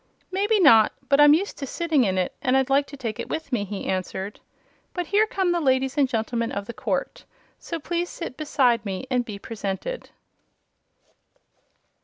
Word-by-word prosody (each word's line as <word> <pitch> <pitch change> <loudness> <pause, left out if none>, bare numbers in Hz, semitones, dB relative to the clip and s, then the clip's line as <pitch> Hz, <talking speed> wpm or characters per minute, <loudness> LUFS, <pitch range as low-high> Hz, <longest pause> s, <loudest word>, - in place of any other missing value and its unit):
"Maybe 410 +3 +2
not; 225 - +6 0.2
but 280 +1 +5
I'm 295 0 +8
used 390 +5 -3
to 275 - -4
sitting 315 -4 +1
in 190 -1 0
it 180 -1 0
and 260 0 +2
I'd 265 0 +1
like 280 +1 +3
to 280 - -10
take 225 -5 -4
it - - -5
with 315 -3 -4
me," 235 -5 0
he 200 0 -6
answered. 190 +2 -3 0.6
"But 355 -1 -2
here 415 +6 +3
come 380 -4 0
the 345 -1 0
ladies 265 -2 +1
and 280 -3 +2
gentlemen 230 0 -1
of 200 0 -4
the 235 - -7
court; - - -3 0.4
so 335 - -5
please 345 +3 -2
sit 335 -7 -6
beside 255 -6 +2
me 195 +2 -4
and 250 -1 +2
be 215 -4 -7
presented." 205 - -5
265 Hz, 185 wpm, -24 LUFS, 220-335 Hz, 0.6 s, I'm